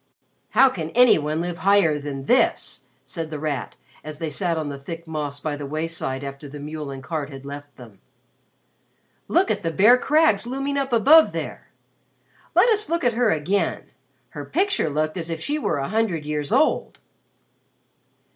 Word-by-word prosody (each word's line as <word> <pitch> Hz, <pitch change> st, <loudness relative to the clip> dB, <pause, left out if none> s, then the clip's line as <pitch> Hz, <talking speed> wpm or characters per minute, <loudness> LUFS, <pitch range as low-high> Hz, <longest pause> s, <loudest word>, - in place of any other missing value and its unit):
"How 270 Hz, -, +8 dB
can 165 Hz, -10 st, -5 dB
any 245 Hz, -7 st, +6 dB
one 155 Hz, +1 st, -2 dB
live 175 Hz, 0 st, -4 dB
higher 190 Hz, -7 st, +3 dB
than 140 Hz, -2 st, -6 dB
this?" -, -, +1 dB, 0.2 s
said 165 Hz, -1 st, -5 dB
The 155 Hz, -, -5 dB
Rat 145 Hz, -5 st, -4 dB, 0.3 s
as 155 Hz, -1 st, -8 dB
they 160 Hz, -1 st, -4 dB
sat 175 Hz, -2 st, -1 dB
on 155 Hz, -2 st, -3 dB
the 140 Hz, -1 st, -6 dB
thick 165 Hz, +4 st, -8 dB
moss 150 Hz, -3 st, -4 dB
by 150 Hz, 0 st, -3 dB
the 145 Hz, -1 st, -6 dB
wayside 155 Hz, -3 st, -3 dB
after 140 Hz, +1 st, -8 dB
the 145 Hz, +1 st, -9 dB
mule 150 Hz, 0 st, -6 dB
and 135 Hz, -1 st, -8 dB
cart 150 Hz, -1 st, -4 dB
had 135 Hz, -1 st, -10 dB
left 145 Hz, -1 st, -9 dB
them. 115 Hz, -6 st, -14 dB, 1.3 s
"Look -, -, +2 dB
at -, -, -1 dB
the 165 Hz, -, -1 dB
bare 215 Hz, +9 st, +5 dB
crags 295 Hz, -8 st, +3 dB
looming 275 Hz, +3 st, -2 dB
up 275 Hz, -1 st, -1 dB
above 285 Hz, +8 st, +6 dB
there. -, -, -6 dB, 0.9 s
Let -, -, +6 dB
us 425 Hz, -1 st, +2 dB
look 335 Hz, +1 st, 0 dB
at 245 Hz, -1 st, +2 dB
her 240 Hz, 0 st, +2 dB
again. 185 Hz, +4 st, -1 dB, 0.4 s
Her -, -, -7 dB
picture 390 Hz, -, 0 dB
looked 155 Hz, +3 st, -1 dB
as 170 Hz, -1 st, -4 dB
if 165 Hz, -1 st, -3 dB
she 295 Hz, -, -2 dB
were 165 Hz, -, -1 dB
a 135 Hz, +2 st, -3 dB
hundred 200 Hz, -8 st, -1 dB
years 150 Hz, -1 st, -3 dB
old." -, -, +1 dB
160 Hz, 180 wpm, -23 LUFS, 145-220 Hz, 1.3 s, How